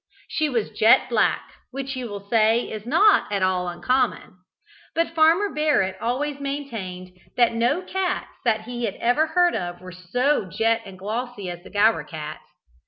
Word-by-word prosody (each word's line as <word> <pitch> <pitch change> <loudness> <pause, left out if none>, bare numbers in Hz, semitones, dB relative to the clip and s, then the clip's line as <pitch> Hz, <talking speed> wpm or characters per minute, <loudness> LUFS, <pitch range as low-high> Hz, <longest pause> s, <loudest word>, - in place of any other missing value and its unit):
She 310 -1 0
was 235 -5 -1
jet 220 +3 +4
black, 230 -3 +1 0.2
which 270 +1 -5
you 250 -2 -5
will 200 -1 -8
say 225 +2 +3
is 215 +1 -7
not 365 - +4
at 200 -2 0
all 185 -1 +1
uncommon; 245 +2 -1 0.6
but 330 0 0
Farmer 330 +5 +3
Barrett 290 -12 +1
always 280 +4 -2
maintained 225 -11 -6 0.2
that 240 -2 +4
no 240 +10 +1
cats 375 0 -2
that 220 -2 +1
he 240 +1 -4
ever 245 +9 +1
heard 350 +2 +3
of 175 0 -4
were 185 0 -10
so 210 +9 0
jet 225 +5 +1
and 195 -1 -10
so - - -18
glossy 215 -2 -4
as 175 0 -8
the - - -12
Gower 210 -5 +3
cats. 155 0 -7
230 Hz, 170 wpm, -23 LUFS, 195-285 Hz, 0.6 s, jet